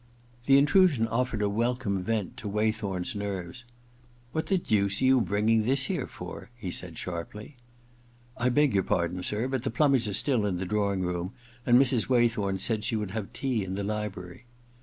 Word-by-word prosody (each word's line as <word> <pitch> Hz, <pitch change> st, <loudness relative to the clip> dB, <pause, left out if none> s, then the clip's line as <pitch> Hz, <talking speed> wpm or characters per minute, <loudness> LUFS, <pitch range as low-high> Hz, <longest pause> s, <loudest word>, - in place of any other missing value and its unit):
The 135 Hz, 0 st, +7 dB
intrusion 145 Hz, -4 st, +4 dB
offered 115 Hz, -1 st, -1 dB
a -, -, +2 dB
welcome 115 Hz, -2 st, -1 dB
vent 110 Hz, -3 st, -2 dB
to 105 Hz, -, -6 dB
Waythorn*s 105 Hz, -3 st, -1 dB
nerves. 100 Hz, +2 st, -5 dB, 0.3 s
* 120 Hz, 0 st, -31 dB
What 160 Hz, +2 st, -2 dB
the 195 Hz, -, +2 dB
deuce 100 Hz, -, +1 dB
are -, -, +1 dB
you 130 Hz, -1 st, +5 dB
bringing 110 Hz, +2 st, +2 dB
this 130 Hz, +4 st, +1 dB
here -, -, -2 dB
for? -, -, -9 dB
* -, -, -30 dB
he 95 Hz, -7 st, -5 dB
said 85 Hz, -2 st, -5 dB
sharply. 100 Hz, -, -6 dB, 0.4 s
* 120 Hz, 0 st, -31 dB, 0.3 s
I 125 Hz, +1 st, +1 dB
beg 145 Hz, 0 st, +3 dB
your 100 Hz, -, +3 dB
pardon, 90 Hz, 0 st, -1 dB
sir, 105 Hz, +6 st, +1 dB
but 130 Hz, -2 st, -2 dB
the -, -, -2 dB
plumbers 130 Hz, -2 st, +2 dB
are 100 Hz, -, -3 dB
still 120 Hz, -3 st, +2 dB
in 95 Hz, -3 st, -1 dB
the 95 Hz, -, -3 dB
drawing 100 Hz, -1 st, 0 dB
room, 90 Hz, 0 st, -3 dB, 0.3 s
and 120 Hz, 0 st, +6 dB
Mrs. 130 Hz, -3 st, +2 dB
Waythorn 115 Hz, -6 st, +2 dB
said 105 Hz, +2 st, -1 dB
she 115 Hz, +1 st, -1 dB
would 105 Hz, -3 st, -3 dB
have 105 Hz, -1 st, -5 dB
tea 125 Hz, -6 st, -1 dB
in 95 Hz, 0 st, -4 dB
the 100 Hz, -, -3 dB
library.' 105 Hz, -1 st, -5 dB
110 Hz, 200 wpm, -28 LUFS, 100-125 Hz, 0.4 s, The